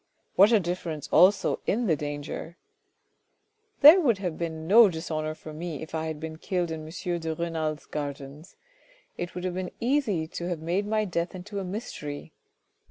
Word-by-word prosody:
What 200 +4 +7
a 225 - +6
difference 170 -4 -4
also 195 +3 +5
in 235 +3 +1
the 165 -7 +3
danger! 145 +3 -6 0.6
" 430 0 -47
"There 310 +6 +10
would 240 - +3
have 180 -4 -3
been 160 -1 -4
no 220 +2 +8
dishonour 155 -2 -3
for 155 0 -10
me 160 -1 -5
if 160 - -11
I 160 0 -2
had 155 -1 -4
been 160 0 -7
killed 175 -2 -1
in 155 -1 -5
M. 175 0 -3
de 160 -1 -3
Renal's 160 -2 -3
gardens. 145 +3 -6 0.6
It 175 0 -5
would 180 - -5
have 185 -1 -2
been 185 0 -3
easy 230 - +1
to 170 +1 -6
have 175 -3 -2
made 175 +6 -1
my 215 0 +1
death 170 -1 -2
into 200 +3 -6
a - - -3
mystery. 180 -7 -6
170 Hz, 180 wpm, -27 LUFS, 160-195 Hz, 0.6 s, There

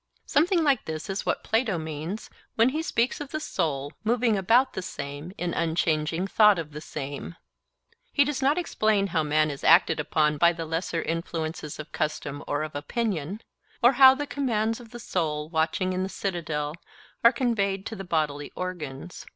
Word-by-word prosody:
Something 335 +3 +3
like 280 -6 +2
this 160 +5 -4
is 195 - -4
what - - 0
Plato 225 -4 +1
means 160 +5 -5 0.2
when 225 +3 +5
he 305 +4 -2
speaks 250 -4 0
of 290 - -6
the 310 - -3
soul 145 - -2
'moving 230 0 +2
about 230 +7 +3
the - - -3
same 145 -1 -6
in 175 -1 -2
unchanging 165 +1 0
thought 210 0 +5
of 160 -2 -5
the 150 +1 -7
same.' 145 +2 -6 0.8
He 285 - +4
does 290 -1 -2
not 280 +4 +3
explain 215 - +1
how 160 - +3
man 155 0 +2
is 140 - -8
acted 165 -1 +5
upon 150 0 +1
by 170 +2 +5
the 165 -1 -5
lesser 165 +1 -2
influences 160 -2 -4
of 155 +1 -8
custom 150 -2 -3
or 145 +1 -1
of 155 0 -6
opinion; 190 +3 -2 0.4
or 240 - +8
how 265 0 +8
the 290 +2 -3
commands 230 -6 -1
of 235 -2 -12
the 240 - -9
soul 155 -9 -2
watching 165 +3 0
in 185 - -1
the 190 - -2
citadel 160 -7 -3 0.5
are 235 - +8
conveyed 205 -6 0
to 225 - -5
the 195 - -6
bodily 150 -5 -1
organs. 175 -3 -6
175 Hz, 180 wpm, -26 LUFS, 155-225 Hz, 0.8 s, or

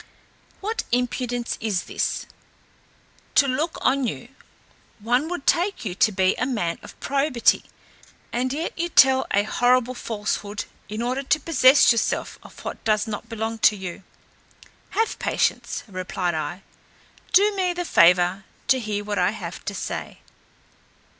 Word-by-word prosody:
What 440 +3 -2
impudence 245 0 -1
is 210 -5 -1
this? - - -2 1.1
To 280 - +6
look 295 +6 -1
on 270 -2 +2
you, - - -6 0.7
one 245 +8 0
would 350 -6 -5
take 360 - +1
you 185 - -2
to 215 +4 +3
be 190 -1 +2
a 250 - +1
man 175 -10 -2
of - - -13
probity, 275 -3 +2 0.7
and 255 +2 0
yet 315 +5 -3
you 345 +1 -2
tell 265 -4 +5
a 200 - +2
horrible 245 +3 +2
falsehood, 210 -3 -3 0.2
in 215 +2 -3
order 255 +3 -1
to 295 +3 +1
possess 280 -4 +5
yourself 230 - -1
of - - -14
what - - -6
does 215 -1 +2
not 220 +2 -6
belong 225 0 -3
to 215 - +5
you." 190 -2 -7 1.0
"Have 450 +1 0
patience," - - -1
replied 185 -2 -3
I; 160 +4 -4 0.7
"do 400 +3 +5
me 370 -2 +1
the 350 0 -3
favour 180 - +4 0.3
to 265 -1 +5
hear 210 -3 -3
what 205 0 -2
I - - +3
have - - -7
to - - -4
say." - - -5
240 Hz, 145 wpm, -23 LUFS, 205-275 Hz, 1.1 s, To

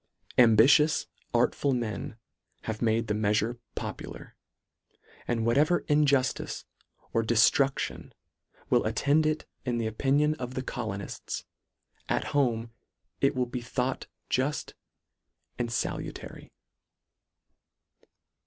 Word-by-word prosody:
Ambitious, 125 +6 +6 0.3
artful 140 -1 +2
men 115 -2 -3 0.5
have 110 -1 -4
made 115 0 +2
the 105 - -1
meafure 110 +3 +1 0.2
popular, - - -7 0.9
and 115 -2 0
whatever 150 +9 +3
injuftice 140 -3 +1 0.5
or 115 - +3
deftruction 120 +4 +2 0.6
will - - +4
attend 155 +2 +2
it 155 0 -1 0.2
in 125 -2 -1
the 115 - -1
opinion 140 +7 +2
of 125 0 -5
the 130 - -2
colonifls, 110 -7 -5 0.7
at - - +1
home 120 -5 +1 0.5
it 140 +1 +2
will 125 -1 +1
be 125 0 -5
thought 125 +2 -2 0.2
juft 135 +4 -1 0.9
and 120 -1 -1
falutary. 115 - -4
125 Hz, 100 wpm, -28 LUFS, 115-140 Hz, 0.9 s, Ambitious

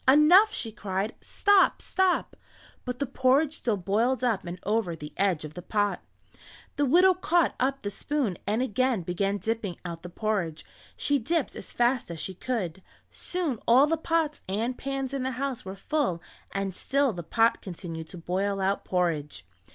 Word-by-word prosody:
"Enough!" 325 +10 +7
she 225 - -4
cried. 200 0 -3
"Stop! 405 -2 +3
Stop!" 375 -1 +1 0.5
but 250 0 -3
the 280 - -1
porridge 270 +4 +2
still 230 -4 0
boiled 220 +8 +1
up 225 -6 +1
and 175 +1 -6
over 205 -4 0
the 150 -1 -9
edge 185 -5 +1
of 155 - -9
the 180 - -7
pot. 205 +2 0 0.7
The 285 0 +1
widow 360 +7 +6
caught 345 -3 +2
up 270 +2 0
the 205 - -2
spoon 255 - -2
and 220 +4 +1
again 255 -3 +1
began 195 +4 -1
dipping 220 -4 -3
out 170 -1 -5
the 180 - -8
porridge; 180 -5 -2 0.3
she 285 -1 +1
dipped 310 +5 -1
as - - -8
fast 240 -1 +1
as 170 -1 -6
she 190 - -4
could. 190 -4 -3 0.3
Soon 335 -10 -3
all 255 +4 +7
the 320 +2 +1
pots 320 -1 0
and 225 +6 -1
pans 270 0 -3
in 275 - -1
the 260 +1 -2
house 265 0 -3
were 190 +1 -6
full 245 - -1 0.3
and 195 -1 -2
still 275 +1 +1
the 175 - -5
pot 225 +7 +2
continued 165 -3 -7
to 180 - -9
boil 195 +4 -1
out 195 +1 0
porridge. 155 - -1
225 Hz, 175 wpm, -27 LUFS, 185-275 Hz, 0.7 s, Enough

